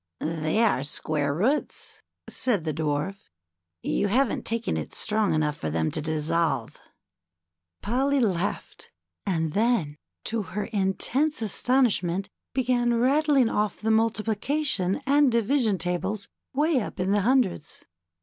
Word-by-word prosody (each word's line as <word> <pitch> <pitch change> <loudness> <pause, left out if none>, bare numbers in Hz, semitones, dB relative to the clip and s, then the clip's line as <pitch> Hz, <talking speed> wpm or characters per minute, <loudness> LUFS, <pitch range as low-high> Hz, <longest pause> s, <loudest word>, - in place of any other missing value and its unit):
^^They 160 +8 +1
are 165 - +1
square 145 0 -1
roots/' 230 - -1 0.3
said 230 -10 0
the 155 -1 -2
Dwarf. 155 +5 -3 0.5
You 205 - 0
haven't 250 +4 +1
taken 230 0 -1
it - - -5
strong 215 -1 +1
enough 150 -1 0
for 80 - -4
them 80 0 0
to - - -2
dissolve." 155 -4 -1 1.0
Polly 270 +6 +1
laughed^ 200 -5 -2 0.4
and 160 -5 0
then, 205 -10 +1 0.3
to 225 0 -2
her 205 +1 -4
intense 230 +8 0
astonishment, 205 -5 +1 0.3
began 245 -2 +2
rattling 275 +1 +3
off 210 -3 -1
the 220 +1 0
multiplication 225 +1 +1
and 280 -1 +4
division 230 -2 +2
tables 185 +4 -2 0.2
way 295 -1 +2
up 205 - -7
in 185 +2 0
the 205 0 +3
hundreds. 225 - 0
210 Hz, 125 wpm, -26 LUFS, 170-250 Hz, 1.0 s, and